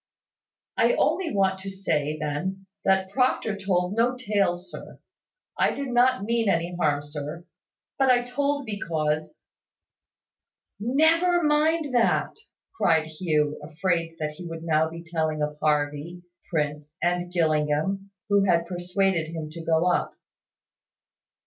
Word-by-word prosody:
"I -, -, +4 dB
only 370 Hz, -4 st, +1 dB
want 190 Hz, -2 st, +1 dB
to 195 Hz, +1 st, -6 dB
say, 155 Hz, -6 st, -1 dB
then, 180 Hz, +6 st, -3 dB, 0.2 s
that 190 Hz, 0 st, +2 dB
Proctor 250 Hz, -3 st, +1 dB
told 190 Hz, -2 st, 0 dB
no 240 Hz, +2 st, +2 dB
tales, 200 Hz, -6 st, 0 dB
sir. -, -, -10 dB, 0.6 s
I -, -, +3 dB
did 280 Hz, -1 st, -4 dB
not 250 Hz, -1 st, +3 dB
mean 230 Hz, 0 st, +1 dB
any 170 Hz, 0 st, 0 dB
harm, 145 Hz, -4 st, +1 dB
sir, 150 Hz, +3 st, -7 dB, 0.5 s
but 270 Hz, -1 st, +4 dB
I 245 Hz, -1 st, +4 dB
told 280 Hz, +3 st, -1 dB
because 155 Hz, -7 st, -2 dB, 0.8 s
" -, -, -64 dB, 0.2 s
"Never 340 Hz, +2 st, +4 dB
mind 300 Hz, -1 st, +2 dB
that," 240 Hz, -2 st, +2 dB, 0.4 s
cried 160 Hz, -, +3 dB
Hugh, 155 Hz, -2 st, 0 dB
afraid 165 Hz, +1 st, -1 dB
that 155 Hz, -1 st, -2 dB
he 175 Hz, +3 st, -9 dB
would 165 Hz, -1 st, -7 dB
now 160 Hz, -1 st, +2 dB
be 165 Hz, +1 st, -9 dB
telling 160 Hz, -2 st, -1 dB
of 150 Hz, 0 st, -4 dB
Harvey, 150 Hz, +3 st, -1 dB, 0.3 s
Prince, 150 Hz, -1 st, -2 dB
and 175 Hz, 0 st, 0 dB
Gillingham, 160 Hz, +3 st, 0 dB, 0.2 s
who 200 Hz, -1 st, +3 dB
had 170 Hz, -3 st, +3 dB
persuaded 180 Hz, -1 st, 0 dB
him 155 Hz, -2 st, -5 dB
to 165 Hz, +1 st, -8 dB
go 165 Hz, +1 st, +2 dB
up. 180 Hz, -, +1 dB
175 Hz, 135 wpm, -26 LUFS, 155-205 Hz, 0.8 s, I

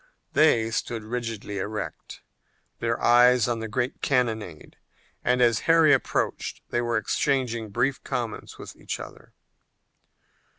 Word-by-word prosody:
They 115 Hz, -8 st, +4 dB
stood 115 Hz, 0 st, -3 dB
rigidly 115 Hz, -3 st, -4 dB
erect, 105 Hz, +2 st, -6 dB, 0.6 s
their 115 Hz, 0 st, -1 dB
eyes 125 Hz, -1 st, +5 dB
on 120 Hz, -1 st, -1 dB
the 110 Hz, -, -4 dB
great 125 Hz, +4 st, -2 dB
cannonade, 110 Hz, -, -1 dB, 0.5 s
and 125 Hz, 0 st, +3 dB
as 115 Hz, -2 st, +3 dB
Harry 165 Hz, -2 st, +6 dB
approached 135 Hz, -, -1 dB
they 120 Hz, -, +1 dB
were 120 Hz, -1 st, 0 dB
exchanging 120 Hz, -1 st, -1 dB
brief 125 Hz, +6 st, -1 dB
comments 120 Hz, -3 st, -4 dB
with -, -, -10 dB
each -, -, -5 dB
other. -, -, -11 dB
120 Hz, 125 wpm, -25 LUFS, 110-125 Hz, 0.6 s, Harry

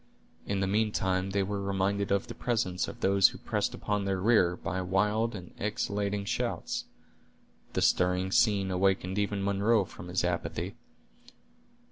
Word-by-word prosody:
In 100 Hz, -1 st, -1 dB
the -, -, +2 dB
meantime 95 Hz, -2 st, +1 dB
they 100 Hz, 0 st, +1 dB
were 100 Hz, +1 st, -3 dB
reminded 100 Hz, +1 st, 0 dB
of 100 Hz, -1 st, +2 dB
the -, -, -7 dB
presence 105 Hz, -7 st, -1 dB
of -, -, -9 dB
those 100 Hz, 0 st, +5 dB
who -, -, -7 dB
pressed -, -, -2 dB
upon 105 Hz, -1 st, -1 dB
their 95 Hz, -1 st, -1 dB
rear, 95 Hz, -4 st, +4 dB
by 95 Hz, +1 st, -3 dB
wild 105 Hz, +5 st, +1 dB
and 90 Hz, -3 st, -9 dB
exulting 100 Hz, -1 st, -1 dB
shouts. -, -, -2 dB, 0.9 s
The -, -, +1 dB
stirring 90 Hz, +1 st, +2 dB
scene 100 Hz, -3 st, +3 dB
awakened 95 Hz, +1 st, +1 dB
even 100 Hz, -1 st, -1 dB
Munro 100 Hz, +2 st, +2 dB
from 90 Hz, 0 st, -11 dB
his 90 Hz, +1 st, 0 dB
apathy. 90 Hz, -1 st, -2 dB
100 Hz, 150 wpm, -29 LUFS, 95-105 Hz, 0.9 s, those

